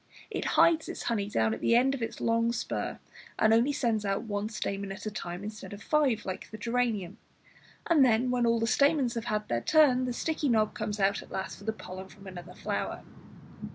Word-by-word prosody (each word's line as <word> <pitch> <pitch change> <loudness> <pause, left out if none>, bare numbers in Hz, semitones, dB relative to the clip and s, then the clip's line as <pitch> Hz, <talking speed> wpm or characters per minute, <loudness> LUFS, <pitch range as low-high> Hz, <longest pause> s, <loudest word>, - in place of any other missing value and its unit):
It - - -3
hides 325 -1 +5
its - - -5
honey 205 -4 -1
down 110 - +1
at 110 - -6
the 230 - +3
end 260 +3 +4
of 270 - -4
its 225 0 -4
long 230 0 +2
spur, 240 - -3 0.4
and 220 0 +4
only 235 +5 +4
sends 230 -6 0
out 195 +1 -1
one 210 -1 -3
stamen 200 -3 -3
at 195 - -8
a 215 - -2
time 180 -2 -6
instead 210 0 -7
of 205 0 -9
five 275 -8 +2
like 185 -1 -5
the 215 - -8
geranium; 225 -4 -1 0.7
and 320 -5 +5
then, 245 0 +3
when 245 -1 +2
all 230 0 +3
the 225 - +1
stamens 280 0 +3
have 230 -2 -4
had 210 0 -1
their 120 0 0
turn, 270 - +4
the 250 - -2
sticky 305 +2 -1
knob 220 -3 +2
comes 210 0 -3
out 195 +1 +2
last 190 +1 -5
for 220 - 0
pollen 190 -3 -9
from 195 +1 -16
another 180 -3 -9
flower. - - -3
220 Hz, 210 wpm, -29 LUFS, 200-245 Hz, 0.7 s, hides